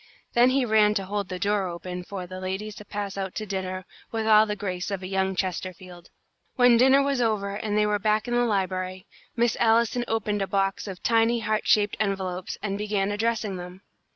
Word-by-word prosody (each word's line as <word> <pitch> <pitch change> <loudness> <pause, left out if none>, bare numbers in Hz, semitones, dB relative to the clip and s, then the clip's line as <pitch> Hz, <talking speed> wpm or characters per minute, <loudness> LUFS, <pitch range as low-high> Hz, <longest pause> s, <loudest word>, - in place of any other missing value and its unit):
Then 240 +1 +5
he 260 0 +2
ran 215 -2 +4
to 195 -2 -1
hold 200 0 -3
the 185 - -4
door 200 +1 0
open 180 +1 -6
for 185 0 -6
the 185 +1 -8
ladies 190 +3 -4
to 210 - -10
pass 205 -1 -4
out 190 -1 -4
to 215 - -3
dinner, 185 -2 -4 0.3
with 225 -1 -2
all 215 0 +6
the 210 - -2
grace 185 -3 -4
of 195 -2 -4
a - - -4
young 190 0 0
Chesterfield. 185 -1 -5 0.5
When 245 -2 +6
dinner 265 +3 +5
was 275 -2 0
over 210 -4 0
and 210 0 -2
they 210 - +4
were 210 0 +1
back 215 +2 +1
in 240 - -2
the 240 0 +3
library, 185 -3 -2 0.3
Miss 235 0 +2
Allison 235 +1 +3
opened 210 -2 -1
a 195 - -1
box 195 +1 -1
of 190 -2 -8
tiny 230 0 +3
heart 215 0 -1
shaped 205 -1 +3
envelopes, 190 -3 -2
and 200 -1 -2
began 205 -1 0
addressing 215 -2 -1
them. 180 +2 -9
205 Hz, 210 wpm, -26 LUFS, 190-220 Hz, 0.5 s, all